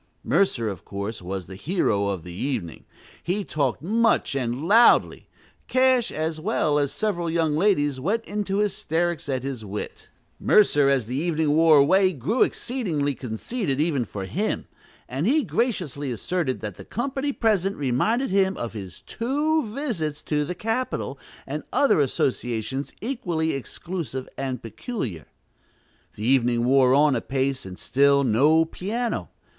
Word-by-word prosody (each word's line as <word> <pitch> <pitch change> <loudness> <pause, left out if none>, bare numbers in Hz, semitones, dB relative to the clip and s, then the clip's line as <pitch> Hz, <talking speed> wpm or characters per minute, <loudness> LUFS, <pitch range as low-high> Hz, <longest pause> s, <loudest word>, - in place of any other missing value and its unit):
Mercer, 125 - +1
of 95 -5 -5
course, 100 +2 -5
was 95 0 -5
the 95 - -10
hero 105 - 0
of 95 -5 -3
the 90 - -8
evening: 105 - -4 0.4
he 190 +4 -1
talked 145 -6 -1
much 225 +1 +2
and 130 +3 -2
loudly. 230 +5 +5 0.4
Cash, 255 -2 +3
as 155 0 -3
well 155 -6 +1
as 140 -1 0
several 175 -6 -1
young 160 -2 +1
ladies, 145 -7 +2
went 210 - -1
into 200 -1 -2
hysterics 175 -6 -1
at 130 -2 -1
his 135 -4 -4
wit. 105 0 -7 0.3
Mercer, 145 -9 +4
as 135 -5 +2
the 125 +4 -4
evening 160 -1 +1
wore 160 -1 +6
away, 185 +7 +4
grew 160 - -1
exceedingly 170 - 0
conceited, 135 - -3
even 150 -5 +1
for 100 -3 -6
him; 95 - -2 0.4
and 135 +8 -2
he 295 +4 +3
graciously 155 - -1
asserted 135 - -2
that 105 -4 -5
the - - -9
company 270 +3 -2
present 200 -6 +1
reminded 185 - 0
him 190 -1 +2
of 120 - -4
his 95 -6 -8
two 295 +7 0
visits 210 - -3
to 150 -1 0
the 180 +5 -4
"Capitol," 225 +7 -2 0.3
and - - -4
other 280 - +3
associations 130 -1 -1
equally 175 -10 -1
exclusive 135 -1 -5
and 130 -3 -4
peculiar. 115 - -5 0.9
The 105 - -5
evening 120 -2 +3
wore 130 0 +5
on 145 -1 +4
apace, 135 -4 -2
and 90 -1 -9
still 140 +1 +3
no 145 +7 +4
piano. 225 +8 -3
150 Hz, 145 wpm, -24 LUFS, 130-200 Hz, 0.9 s, wore